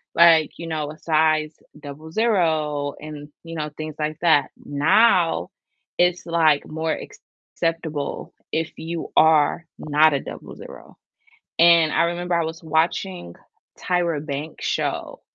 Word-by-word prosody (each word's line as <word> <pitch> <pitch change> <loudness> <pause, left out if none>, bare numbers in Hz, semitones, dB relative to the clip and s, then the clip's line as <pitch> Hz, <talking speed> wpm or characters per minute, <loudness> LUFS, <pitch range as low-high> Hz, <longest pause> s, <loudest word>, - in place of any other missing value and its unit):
like, 165 -2 +6
you 170 - -7
know, 155 -2 -3
a 155 - -12
size 155 -1 +1 0.3
00 155 -2 -1
and, 150 -1 -9 0.2
you 165 0 -8
know, 150 -1 -3
things 155 -1 -6
like 155 0 -2
that, 155 -5 +3 0.2
now 165 - +3 0.5
it's 180 0 +2
like 160 -4 +2
more 160 +1 -2 0.6
acceptable 160 -3 -3 0.2
if 160 0 -2
you 165 +1 -6
are 160 +1 +4
not 150 +1 +3
a 140 - 0
00, - - -11 0.6
and 165 -2 +5
I - - +3
remember 175 +1 -2
I 170 - +1
was 160 +1 -6
watching 160 - -1 0.4
Tyra 170 -4 -1
Banks' 150 +1 -6
show - - -3
160 Hz, 125 wpm, -22 LUFS, 150-170 Hz, 0.6 s, like